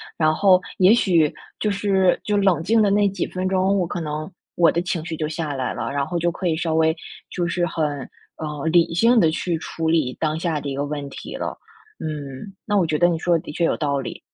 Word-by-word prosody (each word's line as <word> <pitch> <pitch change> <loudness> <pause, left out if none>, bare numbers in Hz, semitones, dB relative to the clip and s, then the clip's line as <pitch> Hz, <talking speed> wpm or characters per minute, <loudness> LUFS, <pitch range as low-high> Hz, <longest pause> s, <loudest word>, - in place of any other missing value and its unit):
然 155 -1 +2
后 185 +2 +4 0.2
也 190 +3 +6
许 170 -9 +3 0.3
就 215 - 0
是 195 -2 +2
就 210 -1 0
冷 190 -5 +2
静 225 +4 +3
的 205 - +4
那 205 +1 +3
几 195 - -3
分 185 0 -3
钟， 190 +1 +2
我 180 - +1
可 175 - -4
能 155 +2 -4 0.2
我 170 -2 +5
的 170 - 0
情 175 -3 -3
绪 160 -2 -4
就 155 - -1
下 155 -1 -3
来 130 -2 -2
了。 - - -4
然 140 0 -1
后 175 +1 -2
就 170 +1 +1
可 180 +1 -3
以 160 - +1
稍 160 -1 -1
微 160 0 +3 0.3
就 175 - -2
是 175 0 0
很， 160 -2 -1 0.5
呃， 150 -1 -5
理 170 -1 +4
性 230 +7 +4
地 165 -6 +4
去 165 +1 -1
处 160 0 -3
理 155 -6 +1
当 155 0 0
下 160 -4 -1
的 140 - -4
一 135 - -3
个 145 - -1
问 145 -1 -5
题 - - -8
了， - - -4 0.4
嗯， 150 +4 -6
那 205 -1 0
我 175 -4 +2
觉 155 -1 0
得 175 +2 +4
你 165 - -1
说 170 0 +2
的 - - -6
的 - - -7
确 170 +3 0
有 - - +1
道 140 -2 -1
理。 130 - -6
165 Hz, 265 characters per minute, -22 LUFS, 155-185 Hz, 0.5 s, 也